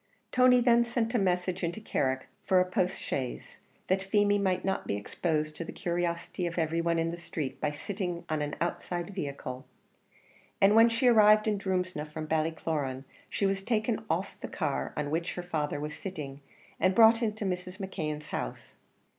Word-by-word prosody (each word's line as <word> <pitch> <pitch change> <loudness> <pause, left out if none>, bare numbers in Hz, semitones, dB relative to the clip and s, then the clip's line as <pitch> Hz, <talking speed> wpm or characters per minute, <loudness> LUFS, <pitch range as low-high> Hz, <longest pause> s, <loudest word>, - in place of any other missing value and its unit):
Tony 250 -1 +6
then 235 -1 +5
sent 235 -1 -1
a 240 - +3
message 180 -1 0
into 170 +5 -2
Carrick 130 -10 -1 0.2
for 185 - +4
a 180 - +4
postchaise, 180 -8 -2 0.3
that 190 +1 +1
Feemy 205 +1 +3
might 185 -2 0
not 190 0 -1
be - - 0
exposed 155 - -2
to 170 - -4
the - - -7
curiosity 175 0 -2
of 170 - -5
every 165 0 +1
one 170 0 +1
in 165 0 0
the 170 - -5
street 155 -5 -5
by 150 - +2
sitting 180 +2 -4
on 155 -1 -1
an 150 0 -2
outside 175 +1 -2
vehicle; 140 -7 -5 1.0
and 195 +1 +6
when 225 +1 +8
she 230 +3 0
arrived 215 -2 +6
in 210 -2 +1
Drumsna 185 -5 -2
from 155 0 -5
Ballycloran, 155 -4 -1 0.3
she 200 - 0
was 195 0 +1
taken 220 +1 0
off - - -2
the - - -5
car 65 0 -2
on 145 -1 -2
which 165 +2 -1
her 180 - -4
father 155 -4 -2
was 150 +1 -4
sitting, 145 -7 -6 0.4
and 185 0 +3
brought 225 +1 +7
into 215 -2 -1
Mrs. 180 0 -3
McKeon's 155 -6 -4
house. - - -5
180 Hz, 180 wpm, -30 LUFS, 155-205 Hz, 1.0 s, when